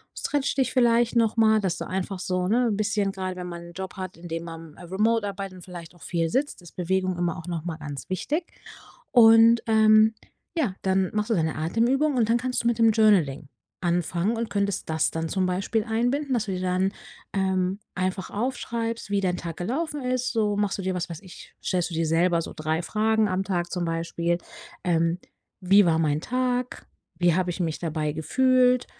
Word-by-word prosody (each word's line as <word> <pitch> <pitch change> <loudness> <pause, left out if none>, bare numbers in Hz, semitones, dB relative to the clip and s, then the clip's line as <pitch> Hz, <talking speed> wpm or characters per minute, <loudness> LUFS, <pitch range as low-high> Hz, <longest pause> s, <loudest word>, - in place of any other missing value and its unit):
stretcht 285 -1 -1
dich 265 - +1
vielleicht 240 -2 +3
noch 230 -1 +2
mal, 220 -1 +4
dass 180 -4 -1
du - - -5
einfach 190 0 -3
so, 185 0 -1
ne, 240 +3 +3
n' 210 -3 0
bisschen 210 -2 0
grade 185 -1 -4
wenn 180 0 -5
man 170 -1 -7
'n - - -13
Job 190 +1 -6
hat, 185 -3 -6
in 175 +1 -10
dem 165 0 -4
man, 165 -2 -9
äh, - - -13
remote 210 +5 +1
arbeitet 195 -1 -6
und 180 - -11
vielleicht 175 -2 -10
auch 175 - -16
viel 165 -2 -1
sitzt, 270 - -1
ist 175 - -15
Bewegung 185 0 0
immer 175 -1 -1
auch 165 0 -9
noch 170 -3 -3
mal 165 -2 -4
ganz 145 -3 -7
wichtig, 290 - -1 0.7
und, 225 -1 +7
ähm, 220 0 +5 0.4
ja, 245 - 0
dann 190 -1 +1
machst 210 +1 -1
du 225 - +2
deine 160 -3 0
Atemübungen 245 - +1
und 230 -3 +3
dann 230 - +4
kannst 250 0 -2
du - - +1
mit 235 - +1
dem 225 -1 +6
Journaling 180 -11 +3 0.3
anfangen 175 +4 0
und 230 0 -3
könntest 200 -3 -1
das 160 -1 +1
dann 165 0 -3
zum 190 +1 0
Beispiel 195 +4 -1
einbinden, 245 +5 0
dass 230 -3 0
du 200 - -4
dir 185 - -2
dann, 185 +1 +1 0.4
ähm, 190 0 0 0.2
einfach 185 0 -2
aufschreibst, 230 -1 -3
wie 200 -1 +1
dein 180 -2 0
Tag 165 -2 -6
gelaufen 290 - -3
ist 255 0 -1
so 210 -3 +1
machst 205 -1 0
du - - -4
dir, 190 0 -1
was 175 -1 -3
weiß 165 -2 -7
ich 185 -3 -13
stellst 180 -2 -1
du - - -8
dir 165 0 0
selber 170 +2 +2
so - - -6
3 155 +1 -1
Fragen 215 +3 +1
am 185 +1 0
Tag 175 -3 -2
zum 180 -2 -2
Beispiel, 170 +1 -1 0.5
ähm: 170 -1 +1 0.4
„Wie 195 +2 +5
war 165 -2 +3
mein 155 -2 +1
Tag? 250 +4 -2 0.3
Wie 175 -2 +4
habe 180 -1 0
ich 180 - -4
mich 160 -3 -2
dabei 155 -2 -2
gefühlt? 250 - +3
190 Hz, 210 wpm, -25 LUFS, 175-225 Hz, 0.7 s, und